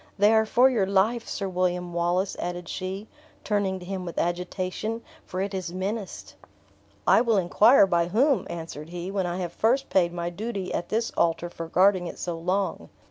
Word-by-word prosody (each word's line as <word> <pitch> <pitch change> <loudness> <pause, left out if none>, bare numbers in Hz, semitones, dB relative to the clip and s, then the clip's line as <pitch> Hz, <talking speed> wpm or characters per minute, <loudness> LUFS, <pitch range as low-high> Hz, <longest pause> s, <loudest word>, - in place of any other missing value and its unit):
They 205 +2 +5
are 220 0 +4
for 250 +4 +5
your 225 -7 +1
life, 210 +5 +1
Sir 195 - -3
William 180 -1 -1
Wallace," 175 +3 0
added 175 0 -4
she, 190 +4 -5 0.4
turning 200 -3 0
to 180 - -10
him 190 0 -4
with 170 -2 -7
agitation, 185 +6 -2 0.2
"for 185 - -3
it 200 +1 -3
is 185 -3 -3
menaced." 195 +2 -4 0.7
"I - - +6
will 230 -3 +2
inquire 205 +6 +6
by 170 -2 +1
whom," 255 +9 +2
answered 160 -2 -7
he, 175 +2 -5
"when 195 -2 -1
I 175 +1 -3
have 175 -2 -4
first 260 +5 +1
paid 175 -2 +3
my 170 0 -3
duty 200 0 -4
at 175 - -3
this 230 +1 0
altar 170 +1 0
for 165 -1 -6
guarding 185 +1 +3
it - - -7
so 175 -1 -3
long. 185 +4 -2
185 Hz, 190 wpm, -26 LUFS, 175-210 Hz, 0.7 s, I